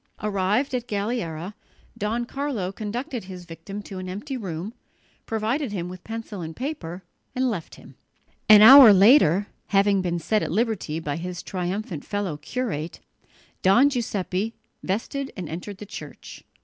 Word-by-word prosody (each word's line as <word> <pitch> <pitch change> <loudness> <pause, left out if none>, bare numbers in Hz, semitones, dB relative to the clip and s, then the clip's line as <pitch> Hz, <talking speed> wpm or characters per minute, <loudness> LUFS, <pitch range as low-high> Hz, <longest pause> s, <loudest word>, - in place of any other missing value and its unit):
Arrived 210 +6 0
at 245 -1 -2
Galliera, 200 -5 -3 0.4
Don 230 +2 -2
Carlo 255 -9 -3
conducted 225 +2 -5
his 180 -2 -9
victim 195 +5 -8
to 190 -2 -8
an 185 0 -6
empty 215 +10 -5
room, 190 -2 -5 0.5
provided 225 +4 -1
him 180 -3 -4
with 180 0 -10
pencil 225 -3 -6
and 160 -1 -6
paper 190 - -5 0.3
and 255 -1 +1
left 175 -7 -6
him. - - -15 0.6
An 210 -1 +10
hour 260 -2 +11
later, 200 - +6 0.2
having 200 -1 +3
been 175 -1 -1
set 210 +6 0
at - - -2
liberty 215 -9 -1
by 150 -2 -3
his 180 +1 -6
triumphant 180 -2 -4
fellow 205 -6 -3
curate, 175 -6 -4 0.6
Don 240 +10 +5
Giuseppe 215 -3 -2 0.3
vested 265 +8 -3
and 180 -3 -5
entered 180 +5 -7
the 210 - -9
church. 205 - -10
205 Hz, 150 wpm, -24 LUFS, 180-235 Hz, 0.6 s, hour